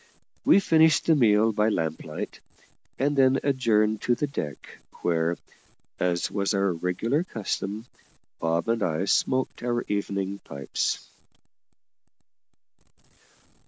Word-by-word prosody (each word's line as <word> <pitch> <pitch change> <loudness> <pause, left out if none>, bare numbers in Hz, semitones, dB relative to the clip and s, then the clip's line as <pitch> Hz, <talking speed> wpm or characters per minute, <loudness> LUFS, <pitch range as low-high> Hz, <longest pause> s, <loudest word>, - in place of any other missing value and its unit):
We - - +7
finished 160 -4 +4
the 165 - +5
meal 110 -4 +4
by 105 +1 +2
lamplight, 80 -6 -4 0.6
and 145 +2 +1
then 135 -1 +4
adjourned 110 -6 +2
to 120 - +2
the 135 - -1
deck, 75 - -6 0.2
where, 85 0 +1 0.6
as 90 -1 0
was 100 0 0
our 100 -2 +1
regular 90 - -1
custom, 105 - -4 0.5
Bob 80 +3 0
and 115 -1 0
I 85 0 0
smoked 130 +6 0
our 120 0 -1
evening 100 -1 -2
pipes. 70 -6 -3
105 Hz, 110 wpm, -26 LUFS, 90-130 Hz, 0.6 s, We